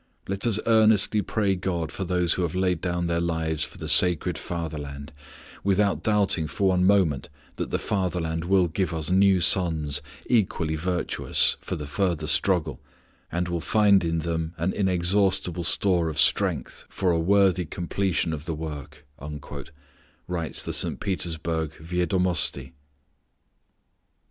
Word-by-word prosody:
"Let 95 +4 0
us 110 -2 +1
earnestly 110 -2 +4
pray 100 -2 0
God 90 -4 -3
for 95 - -4
those 90 -1 +1
who - - -2
have 85 -1 -2
laid 90 -3 0
down 90 -1 -1
their 85 0 0
lives 80 -2 -1
for - - -7
the - - -6
sacred 90 -3 +4
Fatherland, 75 -4 -6 0.5
without 100 0 +1
doubting 100 -7 +1
for 95 +5 0
one 90 0 +2
moment 95 -8 +2 0.3
that - - -3
the - - 0
Fatherland 85 -4 -2
will 95 -1 +3
give 85 0 -2
us 80 +2 -3
new 95 0 +4
sons, 80 -6 +2 0.2
equally 95 -9 +1
virtuous, 90 +2 +1
for - - -5
the 75 - -6
further 80 +1 -1
struggle, 80 -4 0 0.5
and 90 0 -1
will 85 -1 -2
find 100 -1 +4
in 85 0 -1
them 80 0 -3
an 85 +4 -1
inexhaustible 90 -1 +1
store 85 -2 +1
of 75 - -6
strength 75 -1 +1
for 95 -2 0
a 85 - +1
worthy 95 0 +3
completion 90 0 -1
of 75 0 -6
the 80 -1 -3
work," 75 -1 -8 1.2
writes 85 -3 -2
the - - -4
St. - - -1
Petersburg 80 -4 -2
Viedomosti. 90 +2 -1
85 Hz, 145 wpm, -25 LUFS, 80-95 Hz, 1.2 s, earnestly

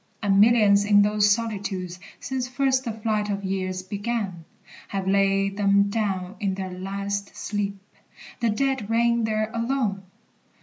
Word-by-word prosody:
And 200 -1 +4
millions 210 -3 +5
in 205 0 +5
those 210 0 +3
solitudes, 200 -5 -2 0.2
since 260 -1 -3
first 260 +1 +1
The 230 - -2
flight 215 -1 -1
of 200 0 -2
years 185 -1 -2
began, 200 -3 -3 0.4
have 195 -1 -3
laid 195 0 +2
them 200 0 +3
down 195 -3 -2
In 195 -3 -1
their 190 -1 -5
last 200 +2 -4
sleep, 200 -1 -3 0.6
the 235 - +1
dead 260 -1 -1
reign 235 0 +2
there 215 0 -1
alone! 230 -4 -1
205 Hz, 140 wpm, -25 LUFS, 195-225 Hz, 0.6 s, millions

